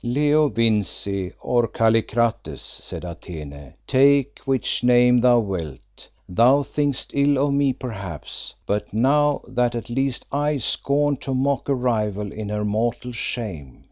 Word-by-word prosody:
"Leo 145 +4 +2
Vincey, 105 -4 0
or 120 -2 +1
Kallikrates," 115 +1 0
said - - -7
Atene, 75 -5 -9
"take 140 +1 +3
which 135 -2 -1
name 125 0 +5
thou 120 0 +5
wilt; 85 - -7 0.2
thou 125 +9 +4
thinkest 145 -2 -1
ill 140 0 +3
of 140 +1 +1
me 140 -1 +2
perhaps, 100 - -7
but 105 0 -2
know 145 +6 +2
that 125 -1 0
at 120 +1 -5
least 135 0 -1
I 145 +1 0
scorn 145 +1 0
to 135 +1 -4
mock 135 +1 0
a 140 - +3
rival 105 -5 -1
in 105 -1 -6
her 105 0 -2
mortal 115 +4 -1
shame. 100 - -5
120 Hz, 140 wpm, -22 LUFS, 105-140 Hz, 0.2 s, name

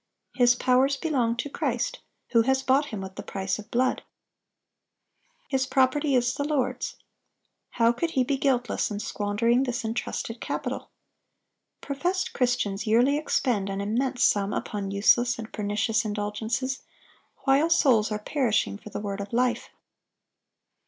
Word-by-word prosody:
His 245 -1 +4
powers 260 +3 +3
belong 260 -8 0
to 235 - -2
Christ, 255 -5 -2 0.3
who 230 - +4
has 265 +3 +1
bought 270 +3 +3
him 210 -3 -5
with 190 0 -8
the - - -4
price 190 +1 -3
of 210 - -10
blood. 255 +2 +1 1.5
His 265 -1 0
property 270 +2 +2
is 245 0 +2
the 285 - -2
Lord's. 290 -3 -1 0.8
How 230 -1 +5
could 330 +8 -2
he 260 - +5
be 275 +3 0
guiltless 260 -3 0
in 205 -1 -4
squandering 215 +4 +1
this 250 -2 -2
intrusted 230 0 -4
capital? - - -4 0.9
Professed 360 +7 -2
Christians 235 -5 0
yearly 245 +6 +4
expend 245 -9 0
an 195 0 -3
immense 245 +6 0
sum 200 0 +2
upon 200 -2 -3
useless 240 +5 +3
and 225 -1 -8
pernicious 210 +2 0
indulgences, 220 +5 -2 0.6
while 280 +4 +3
souls 230 -10 +4
are 210 - 0
perishing 220 -3 0
for 215 - -11
the - - -5
word 200 -1 -4
of 200 - -7
life. 245 +1 0
240 Hz, 145 wpm, -26 LUFS, 210-265 Hz, 1.5 s, How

